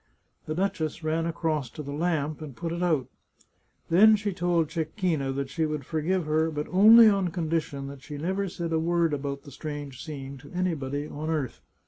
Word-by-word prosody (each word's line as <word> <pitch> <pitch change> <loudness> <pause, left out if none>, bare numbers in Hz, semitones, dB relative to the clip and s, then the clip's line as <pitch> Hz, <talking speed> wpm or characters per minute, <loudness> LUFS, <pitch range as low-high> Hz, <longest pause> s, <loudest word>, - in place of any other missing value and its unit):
The 155 - -2
duchess 165 -4 -2
ran 160 +1 0
across 160 -5 -1
to 150 - -8
the 140 - -6
lamp 155 -1 -1
and 145 -5 -8
put 165 +7 -4
it 170 +1 -3
out. 160 -7 +2 0.9
Then 215 +6 +7
she 205 -1 -2
told 175 -3 +1
Cecchina 160 -4 -1
that 140 0 -3
she 160 0 0
would 150 -3 -4
forgive 165 +3 0
her, 155 +1 +2
but 150 -1 -3
only 220 +5 +9
on 200 -3 +3
condition 160 -4 -2
that 140 -1 -8
she 145 0 -8
never 190 +5 -1
said 170 -1 -4
a 160 - +2
word 170 -1 +1
about 140 -1 -3
the 140 - -12
strange 145 -3 -6
scene 140 -3 -7
to - - -14
anybody 150 -6 -2
on 155 +2 -5
earth. 150 -7 -2
155 Hz, 190 wpm, -27 LUFS, 145-175 Hz, 0.9 s, only